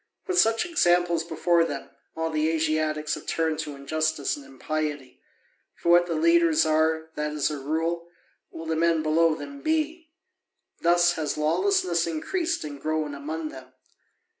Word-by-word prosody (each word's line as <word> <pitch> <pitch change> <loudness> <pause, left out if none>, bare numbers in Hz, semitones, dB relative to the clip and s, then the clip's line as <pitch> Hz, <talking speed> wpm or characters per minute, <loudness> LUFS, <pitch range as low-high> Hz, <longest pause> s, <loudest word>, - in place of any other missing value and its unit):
With 370 -1 +1
such 225 +6 +3
examples 175 - +2
before 170 +1 +2
them, 145 -4 -5 0.2
all 160 0 -2
the 155 0 +1
Asiatics 155 -1 0
have - - -6
turned 160 -1 0
to 145 - -4
injustice 155 +1 -1
and 145 - -11
impiety. 145 +1 -4 0.5
For - - -3
what 175 0 +6
the 170 - -2
leaders 165 0 +4
are, 160 +1 +1
that, 150 -1 -3
as 150 0 0
a 150 - -4
rule, 165 +4 -2 0.4
will 165 - -9
the 160 0 -1
men 165 -1 +2
below 160 +1 +3
them 280 - -9
be. 315 +1 -1 0.7
Thus 175 +1 +4
has 155 -2 -2
lawlessness 170 +2 +1
increased 330 - -2
and 145 -2 -7
grown 155 -1 -1
among 155 +3 -5
them. 130 -2 -12
160 Hz, 155 wpm, -26 LUFS, 155-170 Hz, 0.7 s, what